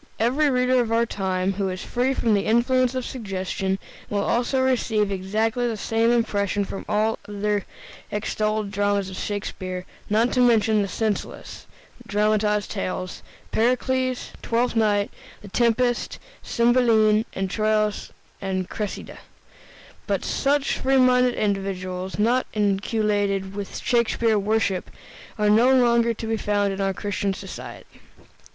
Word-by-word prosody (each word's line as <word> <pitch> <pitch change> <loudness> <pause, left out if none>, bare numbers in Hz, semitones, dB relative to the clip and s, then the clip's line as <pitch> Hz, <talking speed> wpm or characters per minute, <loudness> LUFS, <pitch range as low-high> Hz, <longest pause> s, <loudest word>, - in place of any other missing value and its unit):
Every 270 +6 +2
reader 250 -1 +3
of 230 -2 -2
our 230 +1 +3
time, 190 -3 -1
who 195 0 -1
is 185 0 -5
free 255 +2 0
from 230 -4 +1
the 200 -1 +1
influence 250 +3 +2
of 255 -1 -2
suggestion, 190 -4 -3 0.3
will 200 -1 0
also 245 +3 +1
receive 230 -5 +1
exactly 215 +5 0
the 225 -2 -2
same 225 +2 +1
impression 205 -4 +1
from 195 - -7
all 215 +1 +1
the 205 0 -9
other 205 -1 0 0.4
extolled 215 0 -1
dramas 200 -1 0
of - - -7
Shakespeare, 185 -3 -4 0.2
not 225 +4 +2
to 255 - +1
mention 220 -3 +4
the 200 - -1
senseless, 215 +1 -4 0.4
dramatized 210 0 +1
tales, 185 -2 -4 0.3
"Pericles," 255 +2 0
"Twelfth 235 +1 0
Night," 205 -2 +2 0.3
"The 205 - -10
Tempest," 240 +2 +1 0.2
"Cymbeline," 230 -3 +3 0.2
"Troilus 215 +1 0 0.3
and 185 -2 -2
Cressida." 210 0 -5 0.9
But - - -1
such 280 0 +1
free 270 +1 +2
minded 250 -1 +4
individuals, 190 -2 -2
not 235 +5 +2
inoculated 205 -1 0
with 200 -1 -5
Shakespeare 235 -2 +2
worship, 200 -2 0 0.5
are 210 -1 +1
no 235 +5 +5
longer 235 -2 +3
to 225 - -6
be 225 0 -1
found 205 -2 0
in 195 - -4
our 195 0 +1
Christian 200 0 -2
society. - - -10
215 Hz, 135 wpm, -24 LUFS, 200-235 Hz, 0.9 s, no